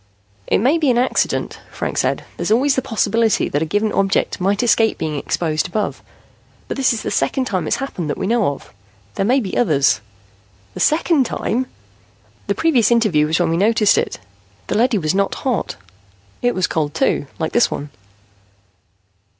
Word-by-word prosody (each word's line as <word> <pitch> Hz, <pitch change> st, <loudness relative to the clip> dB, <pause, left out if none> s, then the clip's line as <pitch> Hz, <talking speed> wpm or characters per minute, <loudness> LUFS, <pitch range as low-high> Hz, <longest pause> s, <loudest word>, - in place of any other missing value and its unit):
"It -, -, +3 dB
may 270 Hz, +10 st, +2 dB
be 300 Hz, -4 st, +2 dB
an 240 Hz, -, +3 dB
accident," 250 Hz, +2 st, 0 dB
Franks -, -, -2 dB
said. -, -, -1 dB
"There's -, -, -3 dB
always 265 Hz, +6 st, +3 dB
the 260 Hz, -, +1 dB
possibility 225 Hz, -1 st, +1 dB
that 145 Hz, -, -1 dB
a -, -, +1 dB
given 210 Hz, +4 st, 0 dB
object 195 Hz, -1 st, 0 dB
might 200 Hz, +4 st, +1 dB
escape 225 Hz, -1 st, +3 dB
being 155 Hz, -1 st, -3 dB
exposed 155 Hz, +3 st, -1 dB
above. 205 Hz, +3 st, -3 dB, 0.7 s
But -, -, -4 dB
this 270 Hz, -1 st, +2 dB
is 230 Hz, -, -3 dB
the -, -, -3 dB
second 265 Hz, -, 0 dB
time 185 Hz, -7 st, -2 dB
it's -, -, +1 dB
happened 185 Hz, -, -4 dB
that -, -, -2 dB
we -, -, -3 dB
know 230 Hz, +1 st, +2 dB
of. 140 Hz, -, -5 dB, 0.4 s
There 195 Hz, -, -1 dB
may 260 Hz, +3 st, +4 dB
be 200 Hz, -7 st, -4 dB
others." 140 Hz, -, +2 dB, 0.7 s
"The -, -, -8 dB
second 310 Hz, -4 st, +2 dB
time?" 255 Hz, +3 st, -2 dB, 0.8 s
"The -, -, 0 dB
previous 285 Hz, -9 st, +3 dB
interview 215 Hz, -11 st, +3 dB
was 160 Hz, +2 st, 0 dB
when 170 Hz, -2 st, +1 dB
we 165 Hz, -, +1 dB
noticed 210 Hz, +1 st, +3 dB
it. -, -, -1 dB, 0.5 s
The -, -, -3 dB
leady 235 Hz, +1 st, +2 dB
was 155 Hz, -3 st, 0 dB
not 195 Hz, 0 st, 0 dB
hot. 245 Hz, -9 st, -2 dB, 0.7 s
It 245 Hz, 0 st, +1 dB
was 185 Hz, -, +1 dB
cold, 150 Hz, -2 st, -2 dB
too, 140 Hz, -, +1 dB
like 160 Hz, -2 st, -2 dB
this 240 Hz, -, +3 dB
one." 145 Hz, 0 st, -6 dB
215 Hz, 185 wpm, -19 LUFS, 170-245 Hz, 0.8 s, may